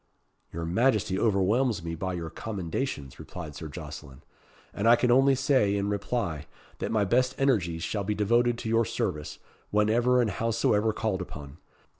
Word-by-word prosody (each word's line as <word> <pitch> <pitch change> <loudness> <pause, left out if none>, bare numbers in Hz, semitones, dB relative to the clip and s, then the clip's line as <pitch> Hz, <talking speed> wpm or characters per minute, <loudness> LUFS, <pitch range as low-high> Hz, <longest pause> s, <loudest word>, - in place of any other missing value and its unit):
"Your 85 0 -4
Majesty 105 0 +1
overwhelms 110 +1 +2
me 85 0 -4
by 95 +3 -3
your 85 -2 -5
commendations," 90 - -4
replied 75 -1 -8
Sir 75 +3 -7
Jocelyn; 75 -3 -9 0.5
"and 105 - -1
I 120 - +8
can 120 +1 +1
only 135 +2 +5
say, 130 -6 +2
in 100 0 -1
reply, 100 -6 -2 0.3
that - - -3
my 110 -2 +2
best 125 +5 +2
energies 90 -12 +1
shall 105 -2 -2
be 105 +2 -1
devoted 120 +3 +2
to 115 - -5
your 115 +1 +3
service, 105 -9 -3 0.3
whenever 115 +4 +3
and 115 -4 +2
howsoever 110 +1 +1
called 105 -3 -2
upon. 75 -4 -9
105 Hz, 160 wpm, -28 LUFS, 85-120 Hz, 0.5 s, I